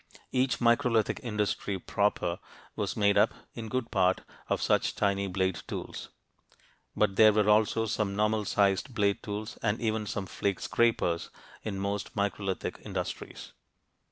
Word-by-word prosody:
Each 130 +1 +1
microlithic 115 -2 +2
industry 105 -3 -1
proper 90 -2 0 0.4
was - - -2
made 100 -1 +4
up, - - +3 0.2
in 115 -1 -6
good 130 0 -2
part, 95 -3 +2 0.3
of - - +1
such - - +1
tiny 100 -1 +1
blade 95 -2 0
tools. - - -6 0.9
But 100 -2 +1
there 110 -1 +8
were 105 0 +2
also 110 +1 +3
some 105 -2 -1
normal 105 0 +1
sized 100 +6 +1
blade 100 -2 +1
tools 105 +1 -5
and 110 0 0
even 110 -2 -1
some 100 0 -3
flake 100 0 -2
scrapers, 110 -8 +1 0.3
in 105 -3 -4
most 100 +1 -3
microlithic 100 -1 -2
industries. - - -5
105 Hz, 140 wpm, -29 LUFS, 100-110 Hz, 0.9 s, there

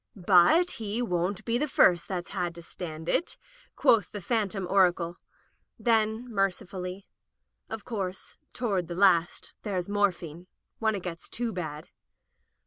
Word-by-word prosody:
"But 200 - +5
he 215 +1 -2
won't 180 -2 -1
be 235 +1 +1
the 300 - 0
first 175 - +4
that's 180 -2 -4
had 175 -3 -3
to 170 - -10
stand 160 -2 -7
it," 340 - +1 0.4
quoth 210 -7 +3
this 205 -4 -7
phantom 205 -5 0
oracle; 175 -3 +2 0.6
then, 225 0 +1
mercifully: 190 -1 -2 0.6
"Of 220 -2 -6
course, 195 -5 -5
toward 200 -8 -1
the 170 - -5
last 175 -3 +3
there's 185 -4 -2
morphine 180 -5 -1 0.2
— - - -53
when 220 -1 +1
it 190 - -5
gets 170 -2 -6
too 235 -1 -3
bad." 155 -4 -5
190 Hz, 140 wpm, -28 LUFS, 175-215 Hz, 0.6 s, But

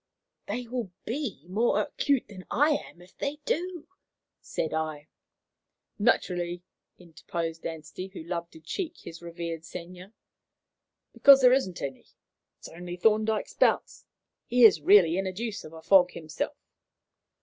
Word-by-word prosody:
"They 240 +4 -4
will 235 -5 -4
be 230 - -4
more 220 +6 +2
acute 280 -4 0
than 185 -3 -12
I 295 +4 +3
am 175 -11 -4
if 180 - -20
they 280 +1 -3
do," 345 -1 -2 0.5
said 160 - -3
I. 155 -1 -3 0.9
"Naturally," 175 -5 +1 0.3
interposed 165 -1 -5
Anstey, 160 +3 -7
who 190 -4 -9
loved 170 0 -5
to 160 - -12
"cheek" 325 - -5
his 165 +1 -10
revered 170 -1 -6
senior, 180 +4 -9 1.0
"because 275 -1 +8
there 250 -1 +7
isn't 225 -10 0
any. 135 -2 -6 0.5
It's - - -11
only 175 +1 -7
Thorndyke's 215 +2 +2
bounce. - - +1 0.4
He 245 0 +3
is 190 -8 +6
really 180 0 +6
in 195 - -1
a - - -2
deuce 220 +2 -5
of 155 - -10
a 160 0 -12
fog 185 -2 +6
himself." 155 -1 -5
180 Hz, 140 wpm, -28 LUFS, 165-230 Hz, 1.0 s, because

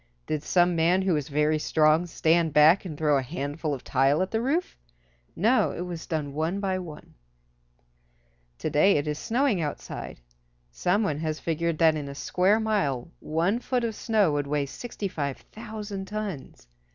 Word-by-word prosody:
Did 155 -1 -2
some 175 +2 +2
man 175 +3 +3
who 190 -2 +2
was 150 -4 -2
very 150 +2 +1
strong 155 +2 +3
stand 165 -1 +2
back 155 +6 +6
and 155 -5 -6
throw 150 -2 +2
a - - -1
handful 145 +3 -4
of 135 -3 -4
tile 135 +6 +2
at 190 - -5
the 225 - 0
roof? 305 +9 -1 0.6
No, 230 +8 +3
it - - -5
was 175 -2 -6
done 150 -4 -3
one 160 +6 -1
by 190 -2 -1
one. 160 -5 -10 1.4
To - - -3
day 195 +7 +5
it 145 +1 -2
is 150 0 -2
snowing 240 -5 +1
outside. 150 - -6 0.5
Some 180 - +1
one 150 -7 -1
has 155 -1 -2
figured 165 0 -1
that 160 -1 +5
in 145 -2 -4
a 140 - -8
square 190 +8 +2
mile 170 - -1
one 170 +9 0
foot 250 0 -1
of 230 -1 -1
snow 210 -5 +1
would 145 -1 -1
weigh 145 0 0
65,000 205 - -6
tons. 200 - -6
165 Hz, 170 wpm, -26 LUFS, 150-200 Hz, 1.4 s, back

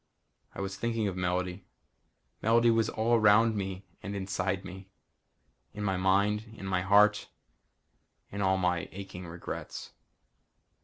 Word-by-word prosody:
I - - -5
was 95 0 -4
thinking 115 -1 -1
of 95 - -3
Melody. 90 +1 -2 0.8
Melody 115 +1 +4
was 115 -1 +2
all 115 +2 0
around 110 0 +5
me 95 -1 -4 0.2
and 100 +2 -5
inside 95 0 -2
me. 95 +1 -10 0.9
In 105 - -4
my 95 -2 0
mind, 100 +4 +1
in 95 - -8
my 95 -1 0
heart, 105 +2 +4 1.0
in 100 - -4
all 95 -1 +3
my 90 -2 0
aching 95 -2 -8
regrets. 85 +1 -7
95 Hz, 135 wpm, -30 LUFS, 95-105 Hz, 1.0 s, around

